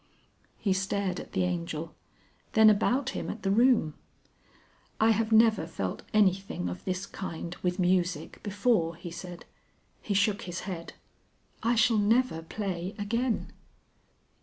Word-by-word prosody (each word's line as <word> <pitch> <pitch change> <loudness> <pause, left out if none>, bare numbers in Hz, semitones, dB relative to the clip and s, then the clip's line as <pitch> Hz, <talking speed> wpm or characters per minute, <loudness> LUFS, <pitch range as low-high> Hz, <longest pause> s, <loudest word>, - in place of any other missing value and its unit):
He 195 - +1
stared 195 -1 -1
at - - -10
the - - +1
Angel, 170 -2 -3 0.6
then 220 -1 +7
about 250 +6 +1
him - - -4
at 215 - -6
the 195 - +1
room. 230 - +4 1.1
"I 220 +1 +5
have 225 +1 0
never 220 -6 +5
felt 95 - -4
anything 190 - +1
of 90 0 -7
this 185 +1 -2
kind 175 -3 -6
with 180 0 0
music 180 -3 0
before," 205 -5 +1
he 170 +1 -8
said. 175 0 -8 0.6
He 205 - -2
shook 205 +2 +2
his 175 - -4
head. 175 -4 -6 0.7
"I 235 +2 +2
shall 225 -1 +4
never 220 -4 +2
play 185 +1 -4
again." 230 +3 -1
195 Hz, 135 wpm, -29 LUFS, 175-220 Hz, 1.1 s, then